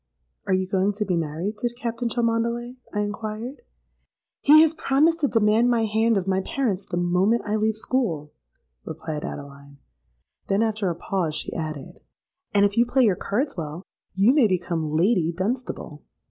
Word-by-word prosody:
'—'Are - - +2
you 185 0 -1
going 195 +1 +1
to 210 +1 -2
be, 185 -2 0
married 170 +6 -3
to 240 - -1
Captain 235 0 -3
Cholmondeley?' 235 +2 -1
I 210 - -1
inquired.—'He 225 - -1
has 320 0 +2
promised 315 +2 +2
to 290 - +2
demand 225 0 +3
my 230 -2 +2
hand 220 +1 +2
of 190 - -1
my 190 0 +1
parents 205 -6 -2
the 175 - -3
moment 180 +6 +2
I 210 0 -1
leave 215 0 +1
school,' 195 - -1 0.5
replied 155 - -5
Adeline: 140 0 -8 0.7
then 195 +3 +2
after 215 -3 0
a 170 - -2
pause, 170 -4 -2
she 150 - -3
added, 155 -4 -6 0.5
'And 200 0 +4
if 200 +1 -1
you 235 - +5
play 260 +1 +3
your 205 -6 +4
cards 260 - -2
well, 160 +1 -6 0.3
you 200 +6 +5
may 280 -6 +5
become 170 -4 -1
Lady 175 -1 +2
Dunstable.' 185 - -4
210 Hz, 165 wpm, -24 LUFS, 175-235 Hz, 0.7 s, you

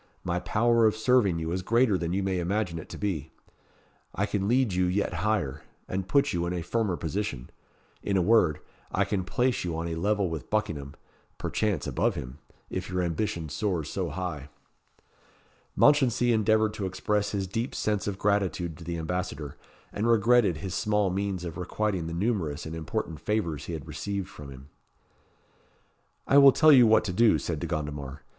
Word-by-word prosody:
My 90 0 -1
power 115 +3 +3
of 110 - +1
serving 110 -5 +3
you 80 0 -3
is 90 +1 -1
greater 115 +2 +3
than 85 -2 -2
you 95 +2 0
may 95 -1 0
imagine 90 -1 -1
it - - -10
to - - -8
be. 80 -8 -3 0.9
I 100 - +1
can 100 -1 -2
lead 125 -3 +2
you 90 0 +2
yet 95 +3 0
higher 95 -10 -1 0.3
and 95 0 -3
put 140 +7 +2
you 85 0 -1
in 90 - -2
a 85 -2 -3
firmer 105 -3 -1
position. 80 -6 -4 0.5
In 100 -1 0
a - - +3
word, 90 -7 +3 0.3
I - - +2
can 95 -3 -1
place 120 +6 0
you 85 -3 -3
on 85 +1 -3
a 85 - -3
level 100 +4 0
with 80 -6 -6
Buckingham, 75 -10 -2 0.4
perchance 105 -8 -1
above - - 0
him, 65 +4 -7 0.3
if 95 0 -5
your 90 -1 -1
ambition 85 -1 -2
soars 80 -1 -2
so 90 -3 -2
high." 75 -4 -5 1.3
Mounchensey 125 -4 +4
endeavoured 110 0 +2
to 100 -3 -3
express 105 +2 -1
his 100 -2 -2
deep 115 +7 -3
sense 105 -2 -1
of 100 -2 -2
gratitude 95 -5 0
to - - -9
the 85 +1 -4
ambassador, 80 -4 -4 0.4
and 105 +3 -1
regretted 115 -5 +4
his 95 +2 -5
small 105 +1 +1
means 95 -2 -2
of 85 0 -6
requiting 95 -1 -2
the 85 - -5
numerous 90 -7 -1
and 80 +1 -6
important 80 +1 -4
favours 100 -8 -2
he 85 - -5
had 80 -4 -6
received 100 -2 -4
from 75 -2 -10
him. 65 +1 -12 1.6
"I 140 - +6
will 140 -1 +9
tell 155 -1 +6
you 125 -5 +8
what 110 0 +5
to 100 -4 -3
do," 115 +4 +4
said - - -3
De - - -4
Gondomar. 75 -3 -4
95 Hz, 185 wpm, -27 LUFS, 85-105 Hz, 1.6 s, will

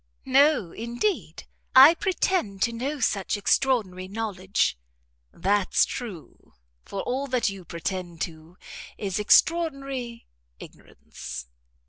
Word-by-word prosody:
"No, 270 - +3
indeed; 240 - -3 0.3
I 270 +5 +10
pretend 355 - -1
to 235 - 0
no 275 +6 -3
such 200 -5 0
extraordinary 205 -5 0
knowledge." 195 - -1 0.6
"That's 195 +3 +2
true; 215 - -9 0.3
for 195 - -5
all 265 +3 -2
that 255 -4 +1
you 195 -2 -8
pretend 170 +1 -5
to 160 +2 -6 0.4
is 195 -1 -3
extraordinary 275 -2 +1 0.3
ignorance." - - -10
220 Hz, 100 wpm, -25 LUFS, 185-270 Hz, 0.6 s, I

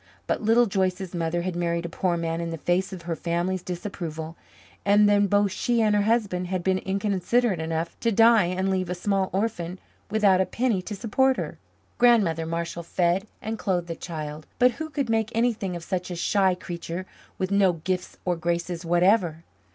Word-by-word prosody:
But - - -1
Little 225 +3 +4
Joyce's 190 -2 -1
mother 170 0 -1
had 185 -1 -3
married 170 -1 -1
a - - -1
poor 175 +1 -1
man 165 0 -2
in 170 - -3
the 165 - -4
face 175 +4 0
of 185 -3 -8
her 170 -1 -2
family's 175 +3 -1
disapproval, 170 -4 -5 0.5
and 205 +1 +5
then 205 0 +4
both 205 0 +2
she 235 +5 0
and 215 -2 +3
her 205 - +3
husband 205 -5 +1
had 185 -1 -2
been 190 0 +2
inconsiderate 200 +2 0
enough 160 +1 -2
to 230 - +1
die 225 -2 +6
and 185 +2 -1
leave 185 -2 -1
a 180 - -2
small 195 +1 0
orphan 185 -3 -2 0.3
without 200 -3 +4
a 190 - 0
penny 230 -3 0
to 205 +3 -6
support 260 +5 +2
her. - - -5 0.4
Grandmother 195 -10 +4
Marshall 170 +1 -3
fed 175 +4 0 0.2
and 220 0 -4
clothed 180 -3 -1
the 165 - -4
child, 155 -2 -6
but 250 0 +5
who 315 +6 -6
could 280 -3 -2
make 225 -1 +1
anything 230 -6 0
of 170 - -6
such 180 0 -3
a 175 - -4
shy 190 +1 +2
creature 175 0 -6 0.3
with 185 +1 -2
no 200 -2 +4
gifts 180 +3 -3
or 180 -1 +1
graces 170 +1 -2
whatever? 175 -1 +2
185 Hz, 190 wpm, -25 LUFS, 170-205 Hz, 0.5 s, die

